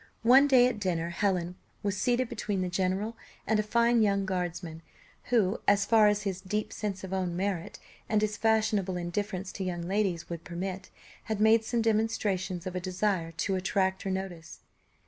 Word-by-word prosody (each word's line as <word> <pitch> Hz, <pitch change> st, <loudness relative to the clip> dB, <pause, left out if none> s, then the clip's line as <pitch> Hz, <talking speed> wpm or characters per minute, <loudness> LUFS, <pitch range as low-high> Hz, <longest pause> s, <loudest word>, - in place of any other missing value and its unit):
One 260 Hz, +5 st, +7 dB
day 255 Hz, -3 st, +6 dB
at 250 Hz, -4 st, 0 dB
dinner, 170 Hz, -4 st, -1 dB
Helen 180 Hz, -1 st, -1 dB, 0.3 s
was 200 Hz, -1 st, 0 dB
seated 245 Hz, +5 st, +1 dB
between 210 Hz, -4 st, -3 dB
the 180 Hz, -, -2 dB
general 190 Hz, +5 st, -1 dB, 0.3 s
and 220 Hz, -1 st, +2 dB
a -, -, +4 dB
fine 235 Hz, +2 st, +3 dB
young 200 Hz, -2 st, +2 dB
guardsman, 175 Hz, -3 st, -4 dB, 0.4 s
who, 220 Hz, -4 st, +1 dB
as 200 Hz, -1 st, +4 dB
far 220 Hz, -2 st, +5 dB
as 210 Hz, 0 st, +1 dB
his 190 Hz, -2 st, -3 dB
deep 210 Hz, +3 st, -3 dB
sense 200 Hz, -3 st, -4 dB
of 190 Hz, -, -6 dB
his -, -, -1 dB
own 180 Hz, -2 st, -2 dB
merit, 185 Hz, -2 st, -2 dB, 0.3 s
and 215 Hz, -, +3 dB
his 210 Hz, 0 st, 0 dB
fashionable 215 Hz, -4 st, +1 dB
indifference 185 Hz, +2 st, -3 dB
to 195 Hz, -, -5 dB
young 175 Hz, -2 st, -3 dB
ladies 185 Hz, -2 st, -1 dB
would 170 Hz, -1 st, -6 dB
permit, 185 Hz, +2 st, -5 dB, 0.4 s
had 220 Hz, -2 st, -2 dB
made 220 Hz, +1 st, +5 dB
some 230 Hz, 0 st, -1 dB
demonstrations 210 Hz, -5 st, 0 dB
of 185 Hz, -1 st, -5 dB
a -, -, 0 dB
desire 185 Hz, -2 st, -1 dB
to 190 Hz, +4 st, -1 dB
attract 190 Hz, 0 st, 0 dB
her 195 Hz, -, -3 dB
notice. 190 Hz, -4 st, -5 dB
195 Hz, 185 wpm, -29 LUFS, 180-215 Hz, 0.4 s, One